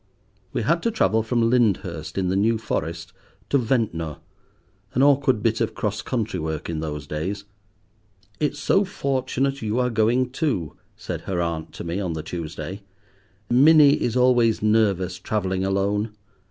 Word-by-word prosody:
We - - -2
had 165 +8 +2
to 230 - +1
travel 160 - +2
from 115 +1 +1
Lyndhurst 100 -10 0
in 95 -1 0
the 95 - 0
New 110 +4 +2
Forest 85 -6 -4 0.4
to 140 - +4
Ventnor, 110 - -1 0.8
an 130 - +4
awkward 135 -5 +3
bit 115 0 +1
of 115 - -1
cross 105 -1 -2
country 110 -7 -2
work 80 +1 -4
in 80 - -3
those 75 -3 -4
days. 90 +8 -4 1.0
"It's 145 -1 0
so 195 +7 +2
fortunate 135 -5 -1
you 110 +1 -1
are 125 -1 +1
going 120 +3 +2
too," 125 - -1 0.2
said - - -5
her 90 -2 -1
aunt 85 -2 -2
to - - -7
me 85 +3 -3
on 90 -4 -2
the 80 -1 -5
Tuesday; 85 +3 -6 0.7
"Minnie 145 +3 +6
is 120 +1 0
always 120 -4 +3
nervous 100 -4 +2
travelling 95 -1 -1
alone. 100 +3 0
110 Hz, 155 wpm, -23 LUFS, 90-125 Hz, 1.0 s, Minnie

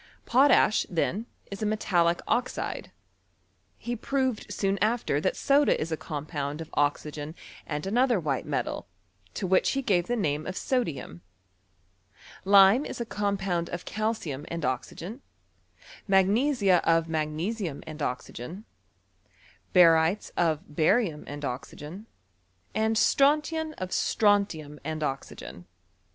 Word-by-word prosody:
Potash, 255 -3 +4
then, 195 +6 -1 0.2
is 200 - -6
a - - 0
metallic 175 -5 +1
oxide. 250 +1 -2 0.9
He 240 0 -4
proved 260 -1 -1
soon 195 0 0
after 215 -9 +1
that 185 - 0
soda 285 +1 +3
is 160 +1 -3
a - - +1
compound 150 -1 -5
of 160 - -8
oxygen 145 +1 -1 0.3
and 150 +1 -3
another 240 +2 +2
white 145 -5 -2
metal, - - -2 0.5
to - - -2
which 185 0 +3
he 275 0 -1
gave 180 -7 +2
the 245 - 0
name 155 -8 -1
of 185 - -4
sodium. 165 - -2 1.2
Lime 200 +6 +7
is - - -6
a 235 - -2
compound 195 -5 -1
of 175 0 -6
calcium 215 -10 -3
and 170 -2 -3
oxygen, 170 - -4 0.9
mag 190 -1 +5
nesia 210 - +3
of 165 0 +3
magnesium 160 +3 -2
and 155 -1 -8
oxygen, 130 - -5 1.1
barytes 165 +1 +4
of 160 -3 +1
bariutu 160 +2 +1
and 145 0 -6
oxygen, 150 - -7 0.7
and 220 +1 +1
strontian 305 +6 +2
of 185 - -4
sfronf 205 -5 +2
lum 150 -1 -11
and 155 +1 -3
oxygen. 135 -10 -6
185 Hz, 125 wpm, -27 LUFS, 155-220 Hz, 1.2 s, Lime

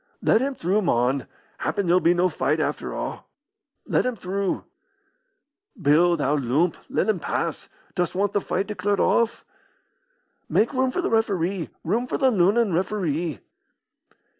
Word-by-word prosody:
"Let 220 - +4
him 275 +1 -1
through, 195 +1 +1
mon. 130 - +1 0.3
Happen 200 -2 -1
there'll 175 +1 +4
be 175 0 +3
no 180 +1 +3
fight - - 0
after - - -2
a'." - - -4 0.7
"Let - - +1
him 255 -1 -1
through." 195 0 -2 1.2
"Bill, 170 +2 +4
thou 150 -1 +1
loomp, 145 +6 +1
let - - 0
him 215 -5 +1
pass. - - -3 0.2
Dost 175 -1 -1
want 200 +2 0
the 205 - +1
fight 190 +1 -1
declared 205 -1 -1
off?" 235 -1 +1 1.0
"Make 230 +6 +2
room 260 0 +2
for 360 +8 -2
the - - -1
referee! 195 -5 0
room 225 +9 0
for - - -2
the 265 -2 +3
Lunnon 205 +1 +3
referee!" 170 - -1
185 Hz, 150 wpm, -24 LUFS, 170-215 Hz, 1.2 s, Let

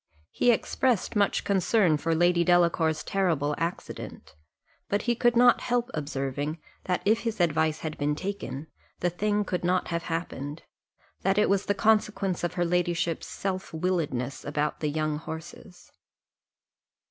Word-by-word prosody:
He 245 - +2
expressed 240 -1 +1
much 205 -1 +2
concern 195 -3 +3
for 165 +2 0
Lady 175 +1 +3
Delacour's 170 -2 +3
terrible 165 -7 0
accident; 165 - -5 0.6
but 205 - 0
he 240 - +2
could 240 0 +2
not 245 +1 +6
help 245 +1 0
observing, 145 +1 -3 0.3
that 180 -1 -1
if 220 +2 +4
his 230 -3 -3
advice 160 -2 +1
had 155 -1 -5
been 145 0 +1
taken, 175 -6 -5 0.4
the 175 - +1
thing 205 +3 0
could 180 -2 -2
not 180 +1 +1
have 170 -1 -1
happened 165 -3 -4 0.6
that 195 +1 +1
it 210 - +3
was 200 0 +1
the 205 - +2
consequence 210 -4 +1
of 175 - -2
her 175 - +1
ladyship's 170 -1 0
self 185 -3 -4
willedness 155 -7 -1
about 150 +1 -2
the 150 - -1
young 155 0 -1
horses. 165 +3 -10
175 Hz, 145 wpm, -27 LUFS, 155-200 Hz, 0.6 s, not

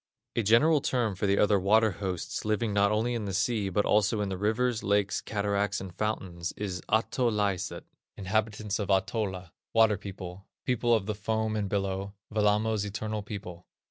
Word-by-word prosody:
A - - +2
general 135 +9 +4
term 120 -6 0
for 95 +2 -1
the 100 +1 +3
other 105 -1 +4
water 110 +3 +4
hosts 95 -3 -4
living 110 0 0
not 100 0 +3
only 115 +3 +1
in 115 -3 -2
the 95 -2 -3
sea, 105 0 +1
but 105 +2 +1
also 105 +1 +3
in 100 -1 -1
the 95 - -3
rivers, 110 +3 +1
lakes, 100 -1 +1
cataracts, 100 -1 -1
and 95 -2 -8
fountains, 90 -5 -3
is 95 -3 -3
Ahtolaiset 110 -4 0 0.3
(inhabitants 105 +1 -1
of 100 -2 -3
Ahtola), 95 -2 0 0.2
"Water 110 -2 +4
people," 95 -1 -8 0.2
"People 120 -1 +2
of 105 -4 -1
the 105 - -1
Foam 110 +1 -1
and 105 -2 -1
Billow," 100 0 -2 0.2
"Wellamo's 105 0 +2
Eternal 105 +1 -3
People." 100 -4 -8
105 Hz, 170 wpm, -29 LUFS, 100-110 Hz, 0.3 s, general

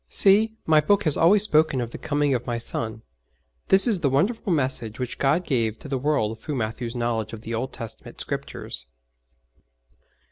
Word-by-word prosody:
'See, 215 +3 +4
My 155 -1 +4
Book 205 +6 +2
has 155 -4 +5
always 195 +5 +4
spoken 155 -8 +2
of 120 -1 -4
the - - -8
coming 145 -1 0
of 120 -1 -3
My 120 -1 -2
Son.' 115 -1 -4 0.6
This 190 +1 +7
is 220 -7 +2
the 145 -5 +1
wonderful 200 - 0
message 130 -7 0
which 125 -2 -5
God 155 +6 +1
gave 115 -5 -1
to 150 - -11
the 135 -2 -2
world 125 -6 -1
through 150 +6 -5
Matthew's 115 +1 -4
knowledge 115 -2 -2
of 110 - -8
the 115 +1 -6
Old 125 +4 -3
Testament 115 -3 -8
Scriptures. - - -5
135 Hz, 180 wpm, -24 LUFS, 115-160 Hz, 0.6 s, This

